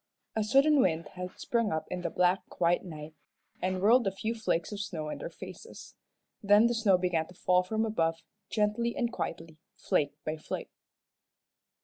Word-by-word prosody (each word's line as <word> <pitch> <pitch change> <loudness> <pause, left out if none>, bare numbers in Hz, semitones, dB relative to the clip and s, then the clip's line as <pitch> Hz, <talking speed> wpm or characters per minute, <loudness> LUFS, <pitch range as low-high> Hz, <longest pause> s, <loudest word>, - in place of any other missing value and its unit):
A 220 - +1
sudden 275 +7 +4
wind 165 - +1
had 180 0 -7
sprung 230 -3 0
up 160 0 -1
in 180 - -3
the 175 - -2
black, 180 +1 +1
quiet 175 0 +1
night, 155 -3 -8 0.5
and 185 0 0
whirled 235 +2 +5
a - - +2
few 215 +4 -3
flakes 215 -7 -1
of 205 - -5
snow 170 -7 -4
in - - -5
their - - -5
faces. - - -11 0.5
Then 205 +2 +6
the 240 - +3
snow 215 -5 +4
began 175 -3 0
to 180 - -15
fall 180 +1 +3
from 220 +4 -1
above, 165 -6 0 0.3
gently 220 +2 0
and 240 -2 -1
quietly, 165 -7 -5 0.2
flake 145 -1 0
by 155 +1 -2
flake. 155 - -6
185 Hz, 175 wpm, -30 LUFS, 165-220 Hz, 0.5 s, Then